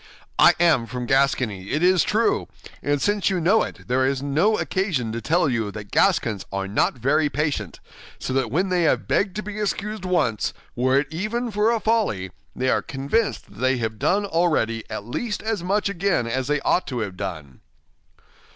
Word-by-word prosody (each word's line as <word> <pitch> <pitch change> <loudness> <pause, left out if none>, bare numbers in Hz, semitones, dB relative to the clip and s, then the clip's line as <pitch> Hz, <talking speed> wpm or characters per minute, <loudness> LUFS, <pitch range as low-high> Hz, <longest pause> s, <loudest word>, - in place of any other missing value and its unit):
"I - - +7
am 160 -9 +3
from 125 0 -4
Gascony, 125 -7 +1
it 155 +4 0
is 185 -1 +5
true; 225 +2 +1 0.3
and 145 0 0
since 205 +5 +1
you 190 -2 0
know 195 +7 +4
it, - - -6
there 125 +2 +2
is 135 0 +1
no 155 +11 +2
occasion 175 - -1
to 115 +1 -4
tell 165 +7 +2
you 115 -5 -1
that 105 0 -9
Gascons 105 -4 +2
are 95 0 -2
not 100 +6 +1
very 145 +5 +2
patient, 145 - -2 0.4
so 130 - -4
that 130 -3 +1
when 180 - 0
they 180 -1 +1
have 165 - +1
begged 195 -2 +1
to 210 - -3
be 210 0 -6
excused 210 0 -3
once, 125 - 0 0.2
were 130 +2 +2
it 145 - -7
even 220 +8 -2
for 210 +2 +2
a 230 -1 +1
folly, 210 - 0 0.2
they 130 +1 0
are - - +2
convinced 140 +12 -1
that - - -16
they 130 +1 +2
have 110 -2 -3
done 200 - +2
already 160 - +1
at 110 -1 -5
least 210 - -3
as 220 -4 -1
much 200 +3 +1
again 195 -8 0
as 130 +3 -2
they 150 0 +1
ought 180 - +1
to 125 -3 -3
have 100 -4 -4
done." 80 -9 -6
145 Hz, 195 wpm, -23 LUFS, 115-195 Hz, 0.4 s, I